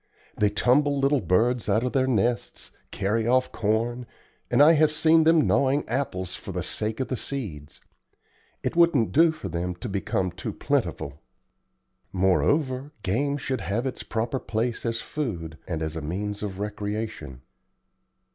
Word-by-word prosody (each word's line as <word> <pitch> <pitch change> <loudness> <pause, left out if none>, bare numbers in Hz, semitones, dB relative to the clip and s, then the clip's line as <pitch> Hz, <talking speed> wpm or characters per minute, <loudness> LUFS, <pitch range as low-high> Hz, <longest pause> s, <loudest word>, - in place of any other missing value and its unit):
They 105 - +2
tumble 140 +7 +2
little 140 0 +2
birds 110 +6 +1
out 110 +4 +2
of 125 - -1
their 130 -1 +2
nests, 120 0 -1 0.2
carry 110 +3 -1
off 130 +1 +2
corn, 115 +3 -1 0.4
and - - +2
I 150 +3 +8
have 155 -1 +4
seen 160 +1 +4
them 165 -1 +5
gnawing 140 +2 +2
apples 115 -8 -2
for - - -7
the - - -3
sake 110 +2 -3
of 130 - -1
the 130 - -2
seeds. 90 - -6 0.8
It - - -2
wouldn't 170 -9 +4
do 165 +2 +5
for 155 -11 -7
them 90 +1 -3
to 90 - -7
become 95 -2 -1
too 90 - -5
plentiful. 70 +2 -2 0.9
Moreover, 130 - +1
game 140 +10 0
should 130 -3 -3
have 105 +9 -2
its 130 - -3
proper 115 +3 -2
place 115 +1 -2
as 115 0 -1
food, 85 - -4
and 80 -2 -2
as 80 +1 -4
a 80 - -4
means 100 +7 -4
of 100 -3 -4
recreation. 105 - -5
115 Hz, 155 wpm, -26 LUFS, 95-135 Hz, 0.9 s, I